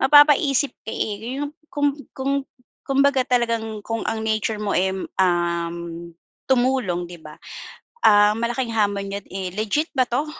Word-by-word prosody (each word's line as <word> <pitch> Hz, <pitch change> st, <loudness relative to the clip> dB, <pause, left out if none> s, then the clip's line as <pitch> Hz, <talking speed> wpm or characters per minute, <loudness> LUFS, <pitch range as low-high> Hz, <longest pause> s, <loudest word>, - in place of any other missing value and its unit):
mapapaisip 290 Hz, 0 st, +5 dB
ka, -, -, -3 dB
eh. 220 Hz, +5 st, -3 dB
Yung 290 Hz, 0 st, -3 dB, 0.2 s
kung 290 Hz, -1 st, +1 dB, 0.2 s
kung 270 Hz, +1 st, -1 dB, 0.5 s
kumbaga 275 Hz, -1 st, +3 dB
talagang 230 Hz, -3 st, 0 dB
kung 225 Hz, 0 st, -2 dB
ang 220 Hz, 0 st, -2 dB
nature 220 Hz, 0 st, 0 dB
mo 210 Hz, -1 st, -2 dB
eh, 190 Hz, +1 st, +2 dB, 0.3 s
um, 170 Hz, -2 st, +1 dB, 0.7 s
tumulong, 245 Hz, -9 st, +1 dB
'di 175 Hz, -1 st, -10 dB
ba, 150 Hz, 0 st, -11 dB, 0.7 s
ah, 210 Hz, 0 st, +6 dB
malaking 235 Hz, +1 st, -2 dB
hamon 200 Hz, -2 st, 0 dB
yun, -, -, -28 dB
eh, 190 Hz, -1 st, -3 dB
"Legit 220 Hz, +10 st, 0 dB
ba 255 Hz, -, +4 dB
'to?" 275 Hz, +6 st, 0 dB
225 Hz, 145 wpm, -22 LUFS, 200-265 Hz, 0.7 s, ah